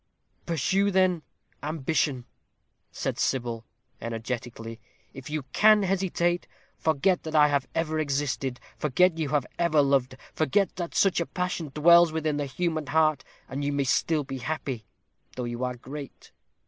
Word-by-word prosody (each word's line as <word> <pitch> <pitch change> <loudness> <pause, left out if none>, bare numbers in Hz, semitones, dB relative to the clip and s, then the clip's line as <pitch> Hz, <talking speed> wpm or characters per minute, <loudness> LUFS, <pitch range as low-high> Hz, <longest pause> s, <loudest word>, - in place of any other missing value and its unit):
"Pursue, 190 +5 +1
then, 185 -3 +2 0.4
ambition," 145 -3 -1 0.7
said - - -3
Sybil, 120 -3 -1 0.3
energetically, 115 0 -5 0.3
"if 135 0 -9
you 150 -1 -2
can 215 -1 +6
hesitate. 180 -2 0 0.3
Forget 165 +4 +1
that 160 0 -5
I 150 -1 +6
have 140 -2 0
ever 160 -1 0
existed; 140 -3 -1 0.2
forget 165 +4 +3
you 155 -3 -1
have 145 -3 +1
ever 155 -4 +4
loved; 135 -2 +1 0.2
forget 195 +5 +1
that 175 -2 -4
such 195 -3 +3
a 170 - -1
passion 180 -3 -3
dwells 170 +3 +6
within 155 -2 -1
the 145 -1 -2
human 160 +1 -2
heart, 155 -2 +2 0.2
and 135 +2 -4
you 145 - 0
may 140 -1 +1
still 150 +3 +1
be 135 -1 -6
happy, 130 -4 -4 0.5
though 125 - -3
you 120 +1 -4
are 125 0 -2
great." 140 +3 -9
150 Hz, 150 wpm, -27 LUFS, 130-170 Hz, 0.7 s, can